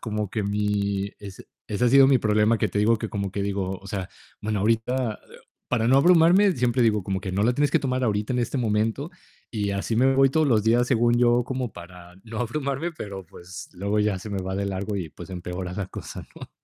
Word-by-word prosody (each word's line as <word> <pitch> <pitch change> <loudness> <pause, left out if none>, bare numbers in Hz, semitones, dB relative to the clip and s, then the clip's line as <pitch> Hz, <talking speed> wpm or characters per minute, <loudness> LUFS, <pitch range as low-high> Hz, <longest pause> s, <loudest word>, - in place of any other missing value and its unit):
como 105 -2 -3
que 110 -1 -2
mi 100 -1 -1
es-ese 100 +3 -6
ha - - +5
sido 135 +1 +7
mi 135 - +5
problema, 110 +1 +2
que - - 0
te 105 - -3
digo 110 +2 +4
que 110 0 -5
como 100 -2 -3
que 100 +1 -3
digo, 95 -2 -2
o 95 - -14
sea, 95 -1 -4 0.3
bueno, 105 -1 -2
ahorita 115 +1 0 0.5
para 115 -1 +1
no 135 - +5
abrumarme 180 +5 +5
siempre 125 -2 0
digo 105 -4 +3
como 95 0 -3
que 95 -2 -5
no 100 +2 0
la 120 +3 +3
tienes 145 +3 +1
que - - +4
tomar 130 -1 -1
ahorita 105 +1 -1
en 125 - 0
este 120 +3 -1
momento 115 - 0 0.4
y 105 -3 -2
así 100 +3 -2
me 130 +3 +4
voy 135 0 +4
todos 155 +2 +2
los 110 -4 +3
días, 120 +2 +3
según 120 -1 +2
yo, 120 0 +3
como 130 -3 -3
para 90 0 -12
no 110 -1 -7
abrumarme 140 +6 -2
pero 100 - -8
pues, 90 +3 -10
luego 100 +3 -2
ya 105 -3 0
se 105 - -8
me 100 -1 -2
va 95 +1 -4
de 100 - -1
largo 100 +1 -3
y 85 -5 -4
pues, - - -11
empeora 90 0 -5
la 95 -1 -3
cosa, - - -8
¿no? - - -10
105 Hz, 225 wpm, -25 LUFS, 100-125 Hz, 0.5 s, sido